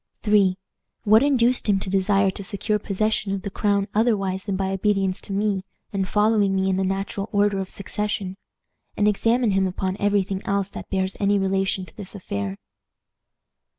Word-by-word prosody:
"III. 200 -3 +4 0.5
What 215 +1 +6
induced 255 -4 +2
him 195 -1 +3
to - - -2
desire 195 0 +3
to 200 - -8
secure 210 +1 -1
possession 210 0 -1
of 195 - -4
the 200 - -4
crown 200 -1 +1
otherwise 200 -4 +1
than 200 -3 -1
by 190 0 -1
obedience 195 -1 0
to - - -8
me, 200 -1 0 0.3
and 195 -1 -1
following 210 -1 +2
me 190 0 +1
in 185 - 0
the 190 - +1
natural 195 +2 -2
order 205 -1 +2
of 190 -1 -4
succession? 200 -1 -3 0.6
And 210 - +3
examine 225 +2 +2
him 195 0 +2
upon 190 +1 -3
every 205 -1 +2
thing 190 0 -4
else 200 0 -1
that - - -8
bears 190 -1 -1
any 200 0 +3
relation 195 -1 0
to 170 - -18
this 205 -1 -8
affair." 100 - -4
195 Hz, 180 wpm, -23 LUFS, 190-210 Hz, 0.6 s, What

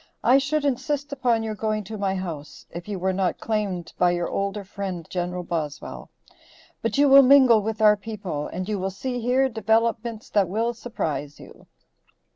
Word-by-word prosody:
I 260 +3 +6
should 290 +2 -1
insist 285 +1 -1
upon 245 -4 +1
your 220 -1 -3
going 215 0 -2
to 215 +3 -7
my 195 -2 -1
house, 165 -6 -6
if 170 +2 -8
you 205 -2 -3
were 190 +1 0
not 185 -1 -1
claimed 200 -6 -2
by 180 - +5
your 175 -1 -1
older 200 +1 -2
friend 190 -3 -5
Gen. 180 0 -2
Boswell. 155 -4 -5 0.7
But 230 +1 -1
you 285 0 +5
will 275 0 +9
mingle 260 -4 +6
with 220 +1 -3
our 210 -1 +7
people, 200 -8 -5
and 185 +1 -5
you 210 -2 -2
will 190 +1 -1
see 245 +6 -4
here 255 +3 +2
developments 225 -1 0
that 200 -4 +2
will 225 +5 0
surprise 155 -11 -4
you." - - -15
215 Hz, 180 wpm, -24 LUFS, 185-235 Hz, 0.7 s, will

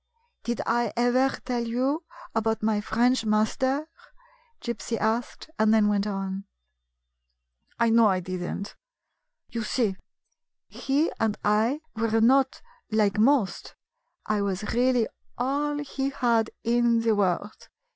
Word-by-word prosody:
"Did 235 -1 -2
I 240 +1 +1
ever 245 +2 +3 0.2
tell 245 -2 -1
you 265 +8 -1 0.3
about 225 -1 0
my 215 -1 +1
French 240 +4 +2
master? 260 +7 +1 0.4
" - - -34
Gypsy 235 -1 -3
asked, 225 +3 -1
and 215 0 +4
then 215 -2 +4
went 205 0 +1
on: 195 -1 -4 1.3
"I 235 -1 +3
know 230 -1 +6
I 190 -2 +2
did 185 0 -5
n't. 200 +3 -5 0.7
You 235 - -3
see, 215 -2 0 0.7
he 285 +4 0
and 220 -2 0
I 220 +8 +2
were 225 0 +1
not 265 +4 +3 0.3
like 210 -2 +1
most. 240 -3 +2 0.5
I 215 -1 0
was 200 +1 -2
really 245 -1 +2 0.3
all 285 +4 0
he 275 -2 -3
had 235 -5 +1
in 235 0 +3
the 225 -1 +2
world. 200 +1 -1
230 Hz, 130 wpm, -26 LUFS, 215-255 Hz, 1.3 s, know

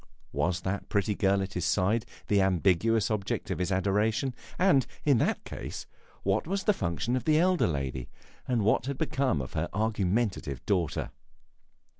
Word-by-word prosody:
Was 85 +6 0
that 100 +2 -3
pretty 105 0 +1
girl 100 0 +2
at 95 +1 -6
his 90 - -2
side 100 +6 +1 0.2
the 100 -1 +3
ambiguous 95 +4 +2
object 100 -2 -2
of 90 - -2
his 90 +1 -1
adoration, 105 +7 +1 0.2
and, 180 -8 +4 0.2
in 140 -6 +4
that - - 0
case, - - -6 0.4
what 100 +8 +1
was 195 +2 -1
the 210 - +4
function 100 - -1
of 130 - -2
the 155 -1 +4
elder 180 +1 +3
lady, 65 -5 -3 0.4
and 120 -4 +1
what 115 +4 +2
had 140 -1 -2
become 135 - 0
of 60 - -9
her 80 +2 -1
argumentative 105 - -1
daughter? 90 -6 0
100 Hz, 165 wpm, -29 LUFS, 90-120 Hz, 0.4 s, and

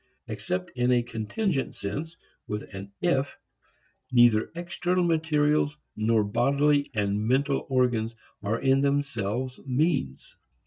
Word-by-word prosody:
Except 90 0 -3
in 125 0 +1
a 120 -1 +3
contingent 135 - -2
sense, 155 +11 -5 0.3
with 105 0 -5
an 100 +1 -7
"if," 140 -6 +1 0.7
neither 120 -3 +5
external 175 +1 -1
materials 150 -3 +2 0.2
nor 110 0 +2
bodily 140 +7 +2
and 105 0 0
mental 135 +2 +1
organs 120 -3 +1 0.3
are 105 +3 -1
in 135 0 +3
themselves 130 -3 -1
means. 135 - -1
130 Hz, 115 wpm, -27 LUFS, 110-150 Hz, 0.7 s, neither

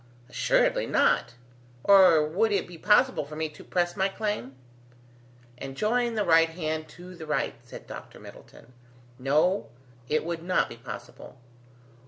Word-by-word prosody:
"Assuredly - - +1
not, - - +2 0.5
or 185 -6 +6
would 200 +9 +1
it 200 -2 0
be 175 - -11
possible 230 - +3
for 150 +2 -10
me 160 0 -2
to 150 - -14
press 175 -1 -1
my 190 0 +1
claim?" 195 - -4 1.0
"And 135 0 -7
join 235 +2 0
the 210 - 0
right 165 0 +5
hand 155 -2 -4
to 180 +1 -11
the 160 -3 -10
right," 150 -2 -1
said - - -12
Dr. - - -10
Middleton; 125 - -15 0.5
"no, 150 - +1 0.4
it 155 +1 0
would 170 -1 -4
not 180 +2 +1
be 120 - -10
possible. 120 +2 -10
170 Hz, 150 wpm, -27 LUFS, 155-195 Hz, 1.0 s, or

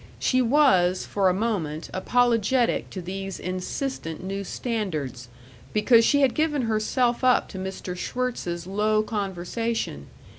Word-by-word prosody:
She 255 0 +2
was, 230 -9 +3
for 195 -2 +2
a - - +2
moment, 180 -8 -2
apologetic 240 +3 +2
to 185 - -7
these 195 +1 -5
insistent 185 - -4
new 195 +1 -3
standards, 155 - -4 0.4
because 230 +2 +5
she 285 +4 +3
had 270 -3 +4
given 300 -3 +1
herself 235 +3 +1
up 255 -1 +4
to 190 - -7
Mr. 185 -1 -5
Schwirtz's 180 -6 -3
low 215 +3 +1
conversation.... 200 - -3
210 Hz, 125 wpm, -25 LUFS, 185-245 Hz, 0.4 s, because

